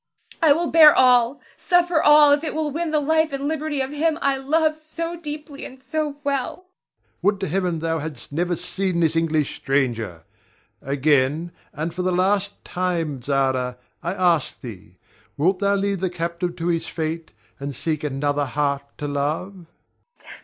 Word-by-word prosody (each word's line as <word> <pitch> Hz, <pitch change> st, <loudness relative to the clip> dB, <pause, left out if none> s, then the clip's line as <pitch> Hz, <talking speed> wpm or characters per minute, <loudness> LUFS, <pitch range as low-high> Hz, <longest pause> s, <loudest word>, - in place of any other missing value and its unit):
I 320 Hz, -3 st, +6 dB
will 335 Hz, +3 st, +2 dB
bear 310 Hz, -2 st, +8 dB
all, 250 Hz, 0 st, +4 dB
suffer 350 Hz, -3 st, +2 dB
all, 295 Hz, -1 st, +7 dB
if 290 Hz, +2 st, +3 dB
it 310 Hz, -, -3 dB
will 310 Hz, -1 st, -1 dB
win 330 Hz, +3 st, -2 dB
the 305 Hz, -1 st, +2 dB
life 315 Hz, +2 st, +2 dB
and 275 Hz, +1 st, -3 dB
liberty 310 Hz, -2 st, -2 dB
of 265 Hz, +1 st, -3 dB
him 310 Hz, +2 st, 0 dB
I 275 Hz, -3 st, +1 dB
love 310 Hz, +4 st, +1 dB
so 330 Hz, +2 st, -5 dB
deeply 300 Hz, -3 st, -7 dB
and 260 Hz, -, -9 dB
so 295 Hz, +2 st, -3 dB
well. 275 Hz, -3 st, -1 dB
Ber. 370 Hz, +1 st, -30 dB, 0.2 s
Would 205 Hz, -1 st, +2 dB
to 195 Hz, -, -1 dB
Heaven 180 Hz, 0 st, 0 dB
thou 165 Hz, 0 st, -1 dB
hadst 155 Hz, -1 st, -7 dB
never 175 Hz, +4 st, 0 dB
seen 185 Hz, +1 st, -2 dB
this 165 Hz, -1 st, +2 dB
English 160 Hz, -3 st, 0 dB
stranger! 115 Hz, -, -1 dB, 0.6 s
Again, 145 Hz, +3 st, +1 dB, 0.2 s
and 160 Hz, +2 st, -4 dB
for 180 Hz, -, -3 dB
the 185 Hz, 0 st, 0 dB
last 195 Hz, +2 st, 0 dB
time, 170 Hz, -7 st, -2 dB
Zara, 130 Hz, -2 st, 0 dB, 0.2 s
I 170 Hz, +3 st, -3 dB
ask 175 Hz, -6 st, +1 dB
thee, 110 Hz, -7 st, -11 dB, 0.4 s
Wilt 180 Hz, +5 st, +2 dB
thou 200 Hz, 0 st, +2 dB
leave 200 Hz, -1 st, -1 dB
the 185 Hz, 0 st, -1 dB
captive 170 Hz, 0 st, -3 dB
to 165 Hz, -, -5 dB
his 165 Hz, -1 st, -1 dB
fate, 160 Hz, 0 st, -4 dB, 0.3 s
and 140 Hz, 0 st, -5 dB
seek 155 Hz, +3 st, -2 dB
another 145 Hz, 0 st, 0 dB
heart 140 Hz, +1 st, -1 dB, 0.2 s
to 145 Hz, -, -4 dB
love? 160 Hz, +6 st, -3 dB
185 Hz, 170 wpm, -22 LUFS, -, 0.6 s, bear